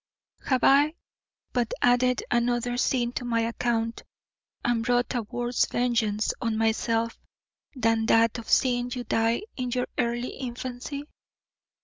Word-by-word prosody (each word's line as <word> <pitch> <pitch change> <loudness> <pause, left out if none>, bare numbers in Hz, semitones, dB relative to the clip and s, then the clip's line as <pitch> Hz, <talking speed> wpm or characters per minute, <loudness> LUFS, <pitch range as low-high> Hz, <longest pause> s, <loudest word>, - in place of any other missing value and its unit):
Have 260 -2 +1
I 290 +3 +5 0.6
but 245 -2 0
added 245 0 +3
another 240 0 +1
sin 245 -1 +1
to 250 - -4
my 230 -1 0
account 230 0 -1 0.6
and 240 -2 +1
brought 245 +1 +1
a 245 - 0
worse 240 +2 -1
vengeance 225 -4 0
on 230 -2 0
myself 225 +1 0 0.6
than 225 -2 +1
that 230 +1 +4
of 230 - -10
seeing 245 -2 +2
you 245 0 -3
die 225 - +1
in 250 -1 -2
your 250 0 0
early 240 +1 0
infancy? 255 +2 -6
240 Hz, 130 wpm, -26 LUFS, 230-250 Hz, 0.6 s, I